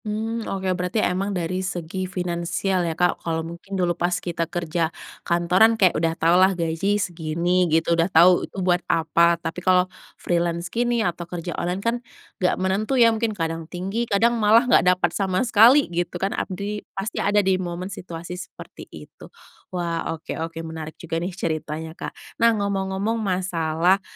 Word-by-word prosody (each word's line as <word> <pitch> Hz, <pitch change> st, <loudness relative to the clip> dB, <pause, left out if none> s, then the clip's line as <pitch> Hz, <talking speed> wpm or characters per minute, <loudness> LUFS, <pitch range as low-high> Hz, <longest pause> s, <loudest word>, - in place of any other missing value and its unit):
Hmm 220 Hz, +2 st, -2 dB
oke, 190 Hz, -1 st, -4 dB
berarti 180 Hz, +3 st, -3 dB
emang 195 Hz, -1 st, 0 dB
dari 185 Hz, -1 st, -2 dB
segi 185 Hz, 0 st, -4 dB
finansial 180 Hz, +1 st, -1 dB
ya 160 Hz, -, -5 dB
Kak, 180 Hz, 0 st, +1 dB
kalau 160 Hz, -1 st, -2 dB
mungkin 170 Hz, +4 st, -7 dB
dulu 175 Hz, -2 st, +1 dB
pas 175 Hz, +1 st, -1 dB
kita 170 Hz, -1 st, -3 dB
kerja 170 Hz, -1 st, -1 dB, 0.3 s
kantoran 180 Hz, +6 st, +3 dB
kayak 185 Hz, -5 st, +4 dB
udah 165 Hz, +1 st, 0 dB
tahu 170 Hz, +3 st, +4 dB
lah 190 Hz, -1 st, +4 dB
gaji 170 Hz, +5 st, 0 dB
segini 175 Hz, 0 st, 0 dB
gitu, 160 Hz, +1 st, +2 dB
udah 165 Hz, +2 st, +2 dB
tahu 180 Hz, +1 st, +5 dB
itu -, -, -14 dB
buat 180 Hz, -1 st, +2 dB
apa. 170 Hz, +1 st, +3 dB
Tapi 165 Hz, +1 st, -5 dB
kalau 185 Hz, 0 st, +4 dB, 0.3 s
freelance 170 Hz, 0 st, -1 dB
gini 240 Hz, -1 st, +1 dB
atau 175 Hz, -1 st, -3 dB
kerja 175 Hz, 0 st, -5 dB
online 180 Hz, +2 st, -2 dB
kan 230 Hz, +1 st, +2 dB, 0.5 s
nggak 180 Hz, -, +2 dB
menentu 200 Hz, +7 st, 0 dB
ya, 230 Hz, -2 st, +6 dB
mungkin 220 Hz, -1 st, -2 dB
kadang 165 Hz, -1 st, -3 dB
tinggi 195 Hz, +6 st, -3 dB
kadang 230 Hz, +3 st, +2 dB
malah 220 Hz, +3 st, +5 dB
nggak 235 Hz, -7 st, +4 dB
dapat 180 Hz, -2 st, +2 dB
sama 190 Hz, +3 st, 0 dB
sekali 240 Hz, +6 st, +6 dB
gitu 175 Hz, +1 st, -2 dB
kan, 195 Hz, +3 st, -1 dB
abdi 205 Hz, +2 st, -4 dB, 0.2 s
pasti 195 Hz, +4 st, -3 dB
ada 205 Hz, +1 st, +1 dB
di 190 Hz, -1 st, +2 dB
momen 180 Hz, +2 st, -5 dB
situasi 175 Hz, -1 st, -7 dB
seperti -, -, -12 dB
itu. -, -, -13 dB, 0.4 s
Wah 170 Hz, -2 st, -3 dB
oke 160 Hz, -, -7 dB
oke 165 Hz, 0 st, -5 dB
menarik 160 Hz, -1 st, -7 dB
juga 165 Hz, -1 st, -4 dB
nih 175 Hz, -, -2 dB
ceritanya 160 Hz, -2 st, -3 dB
Kak. -, -, -10 dB
Nah 230 Hz, -, +7 dB
ngomong-ngomong 200 Hz, +2 st, -1 dB
masalah, 180 Hz, -1 st, +1 dB
180 Hz, 170 wpm, -23 LUFS, 170-195 Hz, 0.5 s, Nah